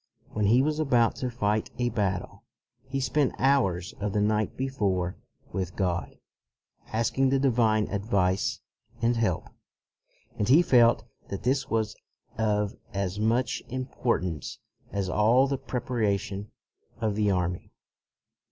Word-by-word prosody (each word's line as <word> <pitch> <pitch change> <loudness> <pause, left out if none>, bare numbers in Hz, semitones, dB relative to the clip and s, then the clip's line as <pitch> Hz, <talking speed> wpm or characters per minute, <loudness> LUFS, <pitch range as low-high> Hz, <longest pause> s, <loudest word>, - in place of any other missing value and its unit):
When 105 -1 0
he 120 +5 +5
was 155 +1 0
about 125 -6 +3
to 125 - -2
fight 110 -3 0
a 120 0 +1
battle, 100 -5 -2 0.4
he 135 +1 -2
spent 135 +2 +1
hours 95 -11 +2
of 100 -1 -2
the 105 - +1
night 105 +1 +1
before 100 -9 -1 0.4
with 95 -1 -3
God, 90 -3 -1 0.7
asking 115 +4 +1
the 135 - +3
divine 115 -5 +2
advice 100 -2 0 0.4
and 120 +1 +2
help, 110 -7 0 0.9
and 105 - 0
he 155 +7 +7
felt 120 -6 +5 0.3
that 100 - -5
this 130 +3 +1
was 110 -1 0 0.4
of 105 0 0 0.2
as 100 0 -2
much 115 +3 +1
importance 120 - -2 0.3
as 100 -2 -1
all 110 +7 +4
the 135 -1 -2
preparation 105 -5 -2 0.5
of 110 -2 0
the 105 0 +1
army. 90 -2 -1
110 Hz, 130 wpm, -27 LUFS, 100-125 Hz, 0.9 s, he